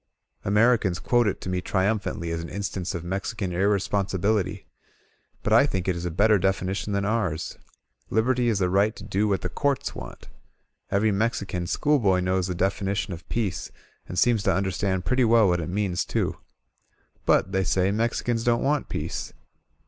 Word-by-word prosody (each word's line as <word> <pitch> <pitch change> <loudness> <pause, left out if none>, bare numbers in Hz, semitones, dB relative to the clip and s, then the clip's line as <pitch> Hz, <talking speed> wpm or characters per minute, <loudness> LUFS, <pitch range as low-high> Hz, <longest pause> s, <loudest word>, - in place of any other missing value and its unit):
Americans 105 -2 +3
quote 120 +4 +2
it 100 - -1
to - - -8
me 90 0 -1
triiunph 100 +3 +1
aiitly 85 0 -3
as 85 - -3
an 85 - -7
instance 95 -1 -3
of 85 - -4
Mexican 95 +2 -3
irresponsibility. 100 +1 0 0.8
But - - +1
I - - +6
think 95 -1 -2
it 95 - +1
is 85 0 -5
a - - 0
better 105 +5 +3
definition 95 +1 -1
than 100 0 0
ours 100 -8 -1 0.2
— - - -40
^Liberty 120 +3 +2
is 110 -3 +2
the 95 -2 +2
right 100 +5 +2
to - - -10
do 105 +1 0
what 100 -3 0
the - - -2
Courts 140 +9 -1
want. - - -9 0.6
Every 105 +2 +2
Mexican 100 -4 -1
schoolboy 110 - +2
knows 90 0 0
the 90 - -3
definition 95 +1 -1
of 85 0 -11
peace 110 -7 -2 0.4
and 90 - -5
seems 115 +2 +3
to - - +2
understand 95 -1 -1
pretty 130 0 +2
well 115 -2 +5
what 90 -1 +1
it 80 - -4
means, 95 -2 0
too. - - -1 0.9
But, 95 - +3
they 95 -1 +1
say, 95 +1 +1
Mexicans 115 +1 0
don't 120 0 +2
want 145 +1 0
peace. - - -4
100 Hz, 180 wpm, -25 LUFS, 90-110 Hz, 0.9 s, I